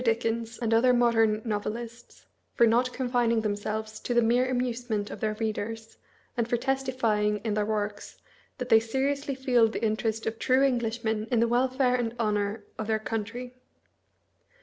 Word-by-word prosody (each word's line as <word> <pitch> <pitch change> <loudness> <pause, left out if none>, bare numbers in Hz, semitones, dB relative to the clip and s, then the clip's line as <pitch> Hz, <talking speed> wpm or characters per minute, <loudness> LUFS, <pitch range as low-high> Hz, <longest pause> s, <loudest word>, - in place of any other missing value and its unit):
Dickens 230 -1 -1
and 230 -1 -1
other 250 +3 +5
modern 225 -3 +3
novelists, 230 +2 -5 0.3
for 235 - +5
not 240 +3 +2
confining 245 -3 +1
themselves 215 +1 -3
to 245 - -3
the 240 - +5
mere 245 +3 +2
amusement 245 -4 -2
of - - -7
their 215 -1 -1
readers, 225 +1 -4 0.4
and 235 -2 0
for 240 - +1
testifying 240 -5 0
in 220 -2 -1
their 210 0 0
works 210 -1 -3 0.4
that 250 -1 -5
they 225 -2 +7
seriously 275 +5 -1
feel 250 -3 +3
the 225 +1 -3
interest 220 +1 -1
of 225 0 -3
true 260 +1 +3
Englishmen 230 -4 0
in 240 -3 +2
the 235 - +3
welfare 255 +1 +2
and 240 -2 -1
honor 210 -2 -1 0.2
of 215 - -3
their 220 -1 +2
country. 225 +3 -5
230 Hz, 160 wpm, -27 LUFS, 220-245 Hz, 0.4 s, they